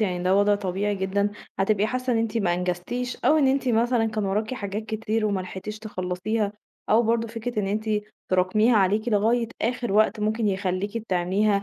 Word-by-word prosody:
يعني 180 -4 0
ده 185 +2 +3
وضع 205 +1 +4
طبيعي 200 +1 -1
جدًا، 200 +1 0 0.3
هتبقى 205 +1 +2
حاسّة 255 +2 -1
إن 230 - +2
أنتِ 225 0 -1
ما 175 -4 +1
أنجزتيش 180 +8 -3
أو 310 - +5
إن 280 -4 +4
أنتِ 265 -1 +1
مثلًا 235 0 +2
كان 215 -2 -2
وراكِ 210 +5 -1
حاجات 205 -2 -4
كتير 220 0 -1
وما 200 -2 0
لحقتيش 190 +3 -6
تخلصيها، 205 +1 -2 0.4
أو 225 +2 +5
برضه 230 0 +1
فكرة 230 0 -4
إن 195 - -2
أنتِ 215 +2 -2 0.4
ترَاكميها 200 +6 +3
عليكِ 210 +4 +2
لغاية 225 +2 +2
آخر 240 -1 -1
وقت 215 +1 +3
ممكن 215 +1 +1
يخليكِ 195 +3 -2
تعمليها 195 +3 +1
215 Hz, 180 wpm, -25 LUFS, 195-225 Hz, 0.4 s, أو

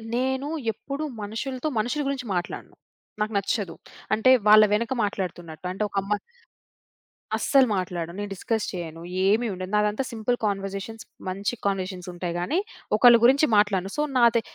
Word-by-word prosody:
నేను 265 +2 0 0.2
ఎప్పుడూ 275 +6 -6 0.2
మనుషులతో 250 +7 -4
మనుషుల 245 +7 -1
గురించి 270 -3 -3
మాట్లాడను. 175 0 -4 0.5
నాకు 215 +1 -1
నచ్చదు. 200 -2 -1 0.4
అంటే 220 +4 +5 0.2
వాళ్ళ 215 0 +9
వెనక 230 +4 +1
మాట్లాడుతున్నట్టు 175 -5 -4
అంటే 195 +3 -2
ఒక 200 - -14
అమ్మా 205 +2 -1 1.2
అస్సలు 270 -2 +4
మాట్లాడను. 175 -2 -3
నేను 205 0 -4
డిస్‌కస్ 220 +3 -2
చేయను. 165 -2 -6 0.3
ఏమి 220 +4 +3
ఉండదు. 185 +1 -6
నాదంతా 210 +4 +1
సింపుల్ 230 +2 -1
కన్వర్‌జేషన్స్ 195 +2 -3 0.2
మంచి 195 +4 -2
కన్వర్‌జేషన్స్ 185 -2 -2
ఉంటాయి 175 -1 -4
గానీ, 240 - 0 0.4
ఒకళ్ళ 240 +1 +8
గురించి 275 +5 +5
మాట్లాడను. 195 -2 +2
సో, - - +2 0.2
నాదే 235 -1 +5
210 Hz, 140 wpm, -25 LUFS, 185-240 Hz, 1.2 s, వాళ్ళ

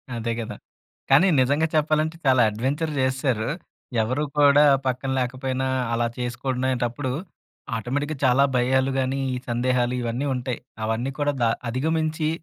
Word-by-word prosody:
అదే 115 0 -2
గదా! 115 - -5 0.5
కానీ 145 +8 +6
నిజంగా 145 +5 +2
చెప్పాలంటే, 155 +1 +1
చాలా 130 -2 +5
అడ్‌వెంచర్ 135 +9 -2
చేస్సారు. 130 -3 0 0.5
ఎవరు 130 +7 -1
కూడా 145 0 +6 0.2
పక్కన 130 +1 -1
లేకపోయినా 130 +1 -2 0.3
అలా 120 0 +1
చేసుకునేటప్పుడు 125 +1 -2 0.7
ఆటోమేటిక్‌గా 145 +6 -3
చాలా 130 +2 +5
భయాలు 130 +2 +2
గాని, 130 +1 -1 0.2
ఈ - - -2
సందేహాలు 125 +1 +1
ఇవన్నీ 120 +4 -2
ఉంటాయి. 125 0 -3 0.3
అవన్నీ 115 +5 -1
కూడా 145 0 +1
ద 120 - +4 0.2
అధిగమించి 155 +4 0
130 Hz, 125 wpm, -24 LUFS, 125-145 Hz, 0.7 s, కానీ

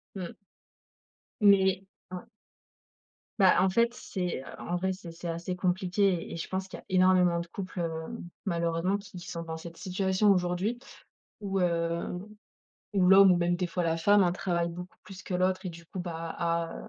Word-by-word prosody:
Mmh. 185 -3 -5 1.1
Mais 195 -2 +5 0.3
a 180 -1 -6 1.2
Bah 190 -2 +6
en 190 - +4
fait, 235 +5 +2
c'est 180 - -4 0.2
en 175 - -3
vrai, 190 +2 0
c'est 185 -2 -9
c'est 170 +1 -8
assez 170 +2 -3
compliqué 185 0 0
et - - -5
je 165 - -5
pense 190 0 -3
qu'il - - -8
y - - -12
a - - -30
énormément 185 -2 +4
de 170 - -5
couples, 185 +1 -6
heu, 165 -1 -1 0.5
malheureusement 170 +1 0
qui 200 -1 -13
qui 175 -1 -9
sont 170 - -5
dans 160 -1 -5
cette 165 +1 -10
situation 190 +2 +1
aujourd'hui, 180 +5 0 0.6
où, 195 -2 -1
heu, 170 -1 0 0.9
où 190 -3 +3
l'homme 195 0 +8
ou - - +3
même 175 0 +1
des 180 0 -1
fois 175 +1 -2
la 165 -1 +1
femme 200 +5 +5
hein, 175 -2 +2
travaille 175 -2 -1
beaucoup 180 +2 -9
plus 190 -2 -11
que 185 - -5
l'autre 185 +1 +1
et - - -3
du 170 0 -13
coup, 185 - -8
bah, 165 -2 -5
a 170 -1 -2
180 Hz, 185 wpm, -29 LUFS, 170-190 Hz, 1.2 s, l'homme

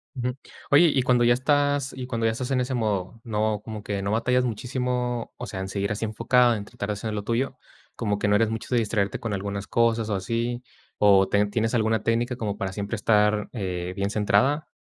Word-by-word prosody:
Ujú, 125 0 -2 0.4
oye, 160 +5 +7
y 130 - +3
cuando 125 -1 +3
ya 120 - +5
estás 145 +1 +1
y 130 -1 -6
cuando 115 -2 -1
ya 115 - +3
estás 125 +3 -4
en 130 - +2
ese 130 +1 -2
modo, 110 -2 -2
¿no 110 -2 -1
como 110 -2 -7
que 100 -2 -3
no 100 +1 -2
batallas 125 +3 +2
muchísimo, 125 0 -2
o 125 - -5
sea, 100 -5 -6
en 95 - -3
seguir 100 +1 -2
así 110 +2 -2
enfocado 115 +2 +3
en 105 - -5
tratar 105 -2 -6
de 105 - +1
hacer 110 +2 -4
lo 105 -1 -3
tuyo? 130 +4 -1 0.4
¿Cómo 105 -3 -1
que 105 - 0
no 105 - +4
eres 110 +1 +3
mucho 115 -1 -4
de 120 - +4
distraerte 105 -3 -1
con 115 -3 -3
algunas 100 +1 -4
cosas 115 -1 +1
o 105 - 0
así? 115 +5 -2 0.3
¿O 100 -2 +5
ten 100 0 +2
tienes 115 +2 0
alguna 110 -1 +1
técnica 120 +2 0
como 105 -4 -3
para 95 -3 -3
siempre 100 +2 -3
estar, 105 -1 +2
eh, 90 -4 -3
bien 100 0 -1
centrada? 110 +9 +2
110 Hz, 225 wpm, -25 LUFS, 105-125 Hz, 0.4 s, oye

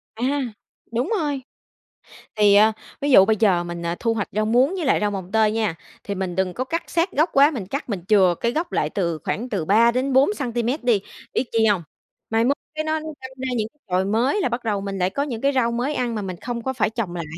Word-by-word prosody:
À, 230 - -5 0.7
đúng 245 - 0
rồi! 290 -3 -2 0.9
Thì, 205 -1 +5
ờ, 215 +2 +6 0.3
ví 285 0 0
dụ 195 - +8
bây 220 +1 +3
giờ 190 -5 +3
mình, 175 0 -6
ờ, 170 +1 -1
thu 230 -1 +1
hoạch 210 -3 -2
rau 215 +1 0
muống 250 - +3
với 350 -6 -3
lại - - +3
rau 210 -1 +1
mồng 190 -1 -6
tơi 220 -1 +3
nha, 215 -6 -1 0.3
thì 200 - -4
mình 185 -2 -3
đừng 190 -1 0
có 255 - -2
cắt 330 +6 -3
sát 345 +2 +1
gốc 310 +5 +2
quá, 280 +2 +6
mình 235 -10 -5
cắt 275 +5 -4
mình 195 -6 -3
chừa 190 -5 +4
cái 235 - +1
gốc 325 +6 -2
lại 150 - 0
từ 170 -3 -2
khoảng 245 +4 -3
từ 190 -7 -2
3-4 255 - +3
xăng-ti-mét 245 - -2
đi. 230 -5 +3 0.3
Biết 250 - 0
chi 225 -1 +3
hông? 205 -5 +3 0.5
Mai 225 +1 +2
mốt 280 +3 +2 0.2
cái 310 - -1
nó 315 0 0
đâm 315 0 -7 0.2
ra 260 0 -4
những 215 - -1 0.2
chồi 185 +1 +1
mới 240 - +1
là 255 - +1
bắt 240 +1 -3
đầu 210 -3 -1
mình 195 -1 -4
lại 180 0 +1
có 280 +7 -1
những 240 -6 -5
cái 275 - +3
rau 235 -3 +2
mới 250 +5 -1
ăn 240 -2 -1
mà 210 - -2
mình 185 -3 -5
không 240 -1 -4
có 265 +2 -2
phải 220 -4 +1
trồng 220 -6 -4
lại. 170 - -3
225 Hz, 250 wpm, -22 LUFS, 200-265 Hz, 0.9 s, dụ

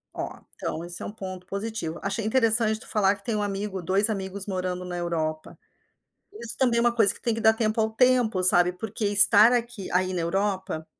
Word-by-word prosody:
Ó, - - -4 0.3
então, 165 - -5
esse 175 0 -3
é - - -6
um - - -6
ponto 185 -3 -9
positivo. 200 -4 -5
Achei 200 +3 -3
interessante 220 -1 +2
tu - - -12
falar 200 -2 +1
que 200 - -18
tem 230 - -2
um 210 - -2
amigo, 200 -1 -4
2 195 +5 0
amigos 195 -1 -5
morando 185 -2 -4
na 180 0 -6
Europa. 160 -3 -4 0.8
Isso 235 - -1
também 245 -3 +1
é - - +3
uma 240 0 +1
coisa 220 -3 +3
que - - -12
tem 235 -2 -1
que 225 - -5
dar 220 0 +4
tempo 220 0 -1
ao 220 0 0
tempo, 245 -3 +1
sabe. 175 -1 +6
Porque 220 +4 -6
estar 205 +3 +7
aqui 240 -4 -3
aí 185 +1 0
na 180 - -3
Europa, 190 -2 -3
200 Hz, 215 wpm, -24 LUFS, 185-225 Hz, 0.8 s, estar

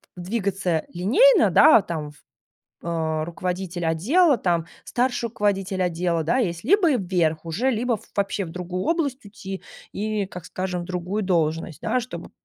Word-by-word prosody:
двигаться 190 -3 -1
линейно, 355 - +5
да, 230 - +7
там, 155 -4 -5 0.7
а, 160 -2 -1
руководитель 180 0 -4
отдела, 265 - +3
там 170 -5 0 0.2
старший 245 -1 0
руководитель 195 -3 -1
отдела, 170 -1 0
да, 170 +12 +1
есть, 175 -7 -1
либо 350 - +4
вверх 175 -5 0
уже, 220 +11 0
либо 235 -1 0 0.2
вообще 200 0 0
в 165 - -8
другую 180 +1 -4
область 285 -7 -1
уйти, 195 -1 -8 0.3
и, 210 -1 -2
как 180 -3 -9
скажем, 180 -1 -4
другую 180 +4 -3
должность, 165 -3 0
да, 255 - +1
чтобы 245 +2 -8
185 Hz, 140 wpm, -24 LUFS, 170-225 Hz, 0.7 s, да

